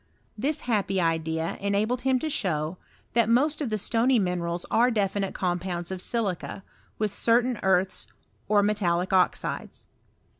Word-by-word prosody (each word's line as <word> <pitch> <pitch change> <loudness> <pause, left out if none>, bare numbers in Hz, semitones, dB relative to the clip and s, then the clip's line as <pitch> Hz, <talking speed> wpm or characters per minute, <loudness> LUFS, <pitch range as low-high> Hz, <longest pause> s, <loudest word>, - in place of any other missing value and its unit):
This 280 +7 -1
happy 205 -5 0
idea 165 -1 -1
enabled 210 +5 0
him 260 0 +2
to 315 - -1
show, 170 - -1 0.3
that 230 -1 +3
most 290 +6 +2
of 275 - -1
the 215 - 0
stony 235 +5 +2
minerals 175 -3 -1
are 240 +2 +4
definite 200 -3 -1
compounds 175 -1 -2
of 185 -1 -4
silica, 195 -3 -2 0.3
with 210 -2 -1
certain 235 +2 +2
earths 190 0 +1 0.4
or 205 -1 +4
metallic 185 -4 +1
osides. 185 -1 0
200 Hz, 140 wpm, -26 LUFS, 180-230 Hz, 0.4 s, are